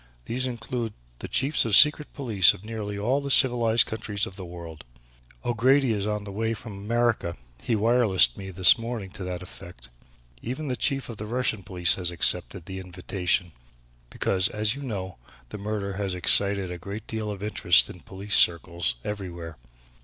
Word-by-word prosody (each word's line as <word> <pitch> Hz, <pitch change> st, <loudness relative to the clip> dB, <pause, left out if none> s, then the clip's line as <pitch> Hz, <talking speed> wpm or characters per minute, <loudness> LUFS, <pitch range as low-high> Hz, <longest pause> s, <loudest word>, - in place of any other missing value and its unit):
These 130 Hz, -, -2 dB
include 120 Hz, -2 st, -4 dB, 0.3 s
the -, -, -6 dB
Chiefs 140 Hz, +4 st, +1 dB
of 115 Hz, -, -2 dB
the 100 Hz, -, +4 dB
Secret 150 Hz, 0 st, +6 dB
Police 110 Hz, -10 st, +4 dB
of 100 Hz, -, -15 dB
nearly 105 Hz, -2 st, -5 dB
all 125 Hz, +8 st, 0 dB
the 140 Hz, -, -5 dB
civilized 120 Hz, -4 st, +5 dB
countries 105 Hz, -2 st, -3 dB
of 95 Hz, -, -10 dB
the 95 Hz, -, -8 dB
world. 85 Hz, -2 st, -10 dB, 0.6 s
O'Grady 130 Hz, +3 st, +3 dB
is 105 Hz, -1 st, -2 dB
on 105 Hz, 0 st, -2 dB
his -, -, -8 dB
way 110 Hz, +2 st, -1 dB
from 110 Hz, -1 st, -9 dB
America, 110 Hz, -3 st, -1 dB, 0.3 s
he 115 Hz, -, 0 dB
wirelessed 105 Hz, -, +3 dB
me 95 Hz, -1 st, -8 dB
this 95 Hz, +4 st, +5 dB
morning 115 Hz, -5 st, -5 dB
to 100 Hz, -1 st, -8 dB
that 90 Hz, 0 st, -5 dB
effect. 85 Hz, -6 st, -12 dB, 0.5 s
Even 135 Hz, +5 st, -5 dB
the 125 Hz, -, -1 dB
Chief 135 Hz, +1 st, -1 dB
of 115 Hz, -, -8 dB
the 105 Hz, -, -6 dB
Russian 120 Hz, -2 st, -1 dB
police 90 Hz, -2 st, +2 dB
has 90 Hz, -, +1 dB
accepted 85 Hz, -1 st, 0 dB
the 95 Hz, -1 st, -7 dB
invitation, 90 Hz, -1 st, -1 dB, 0.6 s
because, 95 Hz, 0 st, 0 dB
as 105 Hz, +1 st, 0 dB
you 140 Hz, -, -8 dB
know, 95 Hz, -, -5 dB, 0.3 s
this 100 Hz, -, -8 dB
murder 100 Hz, -1 st, -3 dB
has 100 Hz, -3 st, -2 dB
excited 100 Hz, +1 st, +3 dB
a 90 Hz, -, -6 dB
great 100 Hz, +5 st, -7 dB
deal 110 Hz, -1 st, -4 dB
of 100 Hz, -1 st, -6 dB
interest 95 Hz, -5 st, +3 dB
in -, -, -11 dB
police 100 Hz, +2 st, -6 dB
circles 85 Hz, -6 st, +2 dB
everywhere. 85 Hz, -6 st, -6 dB
105 Hz, 180 wpm, -26 LUFS, 95-115 Hz, 0.6 s, Secret